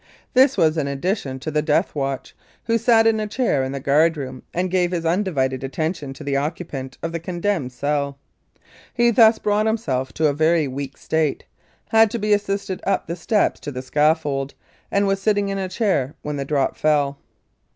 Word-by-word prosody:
This 260 +1 +5
was 160 0 +3
in 140 - -1
addition 140 -1 -2
to 155 - -4
the 150 0 +1
"death 155 +4 +1
watch," 135 -2 -3 0.3
who 230 0 +1
sat 230 -1 +4
in 225 -1 +3
a 215 - -2
chair 210 - 0
in 130 - -3
the 140 - -4
guard 155 +4 +3
room 130 -2 -6
and 180 +1 -2
gave 180 -1 +2
his 170 -2 -3
undivided 160 -8 0
attention 150 +1 -3
to 150 - -10
the 140 -1 -1
occupant 140 -2 -4
of 165 - -2
the 170 - -3
condemned 175 -4 -2
cell. 140 +2 -2 0.8
He 240 -1 +4
thus 225 -1 +6
brought 210 +1 +1
himself 135 - -1
to 160 - 0
a 145 - +3
very 160 +1 +2
weak 135 +1 -6
state 160 -2 -1 0.4
had 225 -1 +5
to 235 - -3
be 210 -1 +1
assisted 200 -2 -1
up 195 0 0
the 170 - -4
steps 205 +5 +1
to 145 - -6
the 130 -1 -6
scaffold, 145 -1 +1 0.3
and 200 0 +2
was 195 0 0
sitting 205 -1 +1
in 195 0 -2
a 190 -1 -3
chair 185 - 0
when 150 -1 -3
the 140 - -3
drop 140 -2 0
fell. 145 -2 +1
160 Hz, 195 wpm, -22 LUFS, 140-200 Hz, 0.8 s, thus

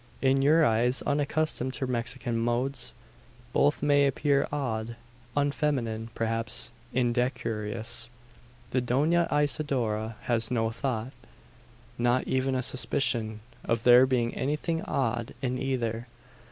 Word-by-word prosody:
In 135 0 +3
your 155 +3 +5
eyes, 120 +2 +2
unaccustomed 145 -1 0
to 135 - -2
Mexican 120 0 -2
modes, 120 +4 -1 0.6
both 145 0 +2
may 145 -1 +4
appear 140 +1 +1
odd 115 -5 -2 0.4
unfeminine 135 -6 0
perhaps 115 - -1 0.2
indecorous. 120 -2 -1 0.6
The 130 - +1
Dona 150 +8 +2
Isidora 130 -7 0
has 115 -2 +1
no 115 -2 0
thought 120 0 -3 0.9
not 120 +1 +2
even 130 0 +1
a 130 - 0
suspicion 120 -5 0 0.2
of 115 -1 -1
there 125 +1 +7
being 120 -2 +1
anything 150 +4 -1
odd 120 - -1
in 125 -1 -2
either. 120 -3 -2
125 Hz, 115 wpm, -28 LUFS, 115-140 Hz, 0.9 s, there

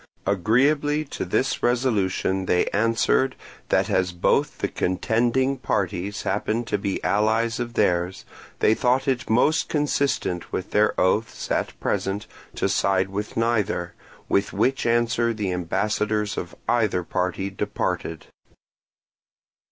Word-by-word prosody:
Agreeably 140 - +2
to - - -5
this 95 +8 0
resolution 100 -6 +1
they 90 - +3
answered 115 +4 +2 0.3
that - - +2
as 90 -1 +1
both 90 0 +1
the - - -1
contending 120 +8 0
parties 100 -2 -2
happened 110 +4 -1
to - - -1
be 100 -2 -2
allies 110 +3 +1
of 120 -1 -4
theirs, 90 +2 +1 0.4
they 110 - +5
thought 125 +4 +1
it 130 -3 -1
most 125 +8 +3
consistent 140 - 0
with 95 - -4
their 105 +1 +2
oaths 100 +5 0
at - - -1
present 100 +2 -1 0.3
to - - 0
side 95 -1 +1
with 105 +2 -5
neither; 110 -6 0 0.3
with 100 0 +1
which 135 -1 +1
answer 115 0 +2
the 100 -4 -2
ambassadors 105 +4 -1
of 90 - -5
either 105 -7 +1
party 90 +2 -2
departed. 90 -5 -3
105 Hz, 125 wpm, -24 LUFS, 95-120 Hz, 0.4 s, they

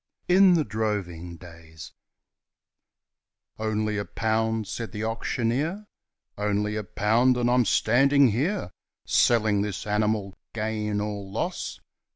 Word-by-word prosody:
In 185 0 +6
the 160 - +2
Droving 95 -6 -3
Days 80 -4 -12 1.7
'Only 110 -1 -1
a 100 - -3
pound,' 110 -1 -1
said 115 +2 -5
the 105 0 -4
auctioneer, 125 - -2 0.5
'Only 105 0 0
a 110 - -2
pound; 115 +6 +2
and 120 -1 +1
I'm 125 -1 +3
standing 140 +3 +4
here 125 - -1 0.3
Selling 110 -4 +3
this 105 -2 -4
animal, 105 -1 0 0.2
gain 105 -1 -2
or 105 -1 -4
loss. 95 - -4
110 Hz, 115 wpm, -26 LUFS, 105-120 Hz, 1.7 s, In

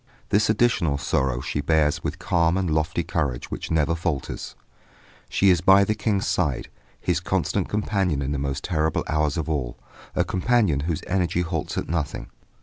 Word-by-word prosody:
This 105 +2 +3
additional 110 -10 +2
sorrow 65 -2 0
she 75 0 -2
bears 75 0 +2
with - - -3
calm 85 -2 +1
and 95 -1 0
lofty 80 +2 0
courage 70 -9 -2
which - - -5
never 80 -1 +2
falters. 85 -4 -3 0.7
She 100 -1 +4
is 85 -3 +2
by 95 +2 +6
the 105 - +1
King's 105 -2 0
side, 75 -9 0 0.3
his - - 0
constant - - -1
companion 95 -8 0
in 70 - -2
the 70 - -1
most 70 0 -3
terrible 80 -3 0
hours 75 -2 0
of 80 - -2
all; 65 -7 -2 0.4
a - - +3
companion 100 - +2
whose 80 - -2
energy 90 -2 0
halts 85 -3 -3
at - - -2
nothing. 80 -4 -3
80 Hz, 170 wpm, -24 LUFS, 75-95 Hz, 0.7 s, by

